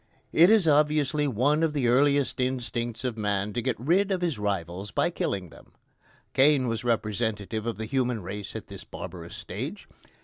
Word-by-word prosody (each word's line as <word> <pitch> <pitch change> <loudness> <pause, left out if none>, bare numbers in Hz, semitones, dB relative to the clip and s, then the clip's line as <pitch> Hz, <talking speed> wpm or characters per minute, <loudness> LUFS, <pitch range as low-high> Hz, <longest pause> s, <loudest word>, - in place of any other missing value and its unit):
It 170 +3 +7
is 215 -6 +5
obviously 150 -1 +3
one 140 +5 +2
of 160 -2 +1
the 135 -5 +1
earliest 140 +3 +3
instincts 120 -2 -2
of 120 -3 -3
man 105 0 -1
to 120 - -1
get 120 -3 -2
rid 180 - +2
of 185 -2 0
his 165 -10 -1
rivals 95 -1 -3
by - - +1
killing 95 -3 -2
them. - - -17 0.6
Cain 135 -1 +4
was 115 -1 -2
representative 110 -1 -1
of 115 - -2
the 110 - -4
human 125 -2 -1
race 100 +2 -6
at - - -5
this - - -10
barbarous - - -8
stage. - - -6
120 Hz, 175 wpm, -27 LUFS, 105-145 Hz, 0.6 s, It